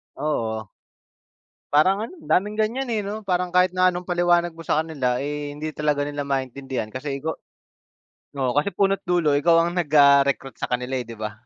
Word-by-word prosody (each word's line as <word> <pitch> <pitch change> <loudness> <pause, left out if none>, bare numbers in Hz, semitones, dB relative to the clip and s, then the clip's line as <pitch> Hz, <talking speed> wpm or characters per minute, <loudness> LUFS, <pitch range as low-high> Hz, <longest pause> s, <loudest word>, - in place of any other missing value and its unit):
Oo. 110 -8 -2 1.0
Parang 185 +7 +4
ano, - - -13
daming 210 - 0
ganyan, 235 +5 -1
eh, 215 -3 -1
no? 210 +2 -4
Parang 180 -3 -1
kahit 180 0 +5
na 185 0 +4
anong 175 - -4
paliwanag 175 -1 +2
mo 165 - -10
sa 155 - +2
kanila, 135 -6 -1
eh, 145 0 -4
hindi 155 +2 -5
talaga 150 -1 -1
nila 145 0 -3
maintindihan. 135 -3 -3
Kasi 135 +3 -5
ikaw 160 +2 -3 1.0
oo, 130 -2 0
kasi 145 +7 +1
puno't 195 0 +2
dulo 175 -4 +2
ikaw 165 +3 +4
ang 170 - -2
nag, 170 - -1
ah, 140 -1 +7
recruit 135 -2 -2
sa - - -2
kanila, 125 +1 -2
eh, 125 - -6
'di 115 - -8
ba? 110 0 -4
150 Hz, 190 wpm, -23 LUFS, 135-180 Hz, 1.0 s, ah